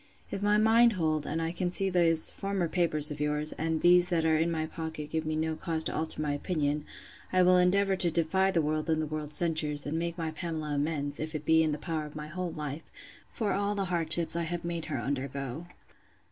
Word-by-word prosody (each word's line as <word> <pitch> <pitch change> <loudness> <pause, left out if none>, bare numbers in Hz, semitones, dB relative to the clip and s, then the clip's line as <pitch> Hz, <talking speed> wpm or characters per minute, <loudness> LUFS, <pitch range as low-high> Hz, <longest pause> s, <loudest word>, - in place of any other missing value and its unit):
If 195 - -4
my 205 +1 +3
mind 225 +2 +5
hold, 155 -5 -1
and 160 - -2
I 165 0 -1
can 175 +1 -2
see 195 +2 +4
those 170 -3 +1
former 195 -3 -2
papers 155 -3 +2
of 145 - -6
yours, 150 +1 0
and 160 +1 -2
that 160 - -3
these 175 0 +5
in 160 -1 +2
my 160 -1 -1
pocket 160 -2 -6
give 160 -1 -2
me 155 - -1
no 160 0 -1
cause 160 0 -1
to - - -1
altar 155 -1 0
my 150 - -1
opinion, 150 -1 -1 0.5
I 185 0 +4
will 180 0 +5
endeavour 195 +2 +3
to 180 -2 +5
defy 170 +4 +1
the 170 -4 +1
world 155 +2 -1
and 160 -1 +2
the 155 - -1
world's 150 0 -4
censures, 155 -4 +1
and 160 +3 -2
make 170 0 -3
my 165 -2 -3
Pamela 155 -2 -4
amends, 145 -1 -2
if 155 +1 -4
it 150 0 -5
be 160 +1 +5
in 160 -1 +1
the 150 - -2
power 155 0 -3
of 150 - -14
my 150 0 -6
whole 180 +1 -4
life, 150 0 -6 0.4
for 215 -4 -2
all 200 +1 0
the 200 -1 -1
hardships 165 -1 +1
I 170 - 0
have 170 +1 -3
made 170 -1 -3
her 145 - -3
undergo. 140 +3 -4
160 Hz, 230 wpm, -29 LUFS, 155-175 Hz, 0.5 s, mind